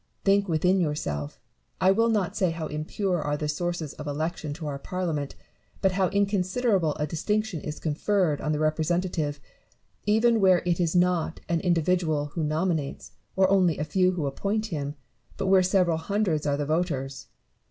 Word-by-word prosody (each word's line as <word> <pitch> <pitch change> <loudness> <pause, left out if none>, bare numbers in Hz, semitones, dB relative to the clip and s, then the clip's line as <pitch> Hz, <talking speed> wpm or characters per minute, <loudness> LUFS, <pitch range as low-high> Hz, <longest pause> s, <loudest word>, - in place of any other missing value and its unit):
Think 200 0 +3
within 180 +4 +2
yourself, 75 - -3 0.4
I 190 - +5
will 230 +4 +3
not 205 -6 0
say 185 - +2
how 165 -1 -4
impure 160 +4 -2
are 145 0 -1
the 150 - -3
sources 170 0 -2
of 150 - -8
election 155 +1 -3
to 160 +1 -7
our 140 -2 -4
Parliament, 165 -5 -3 0.4
but 190 - +2
how 185 0 +2
in 200 +2 +2
considerable 195 -3 +1
a 150 - -1
distinction 210 +3 -1
is 150 0 -6
conferred 160 0 0
on 155 - -1
the 150 - 0
representative, 155 -1 0 0.7
even 225 +2 +4
where 185 -2 +5
it 175 -1 +1
is 170 -1 +1
not 175 -2 +1
an 170 -1 +1
individual 165 -4 +1
who 165 - -2
nominates, 155 -1 -1 0.2
or 190 0 +4
only 185 -5 +3
a - - -1
few 185 +4 +2
who 165 -5 -2
appoint 200 +10 -1
him, 145 -1 -3 0.4
but 195 - -2
where 190 0 +5
several 180 -3 +2
hundreds 165 -3 -1
are 140 0 +1
the 145 - -1
voters. 140 -5 -2
170 Hz, 175 wpm, -26 LUFS, 150-190 Hz, 0.7 s, I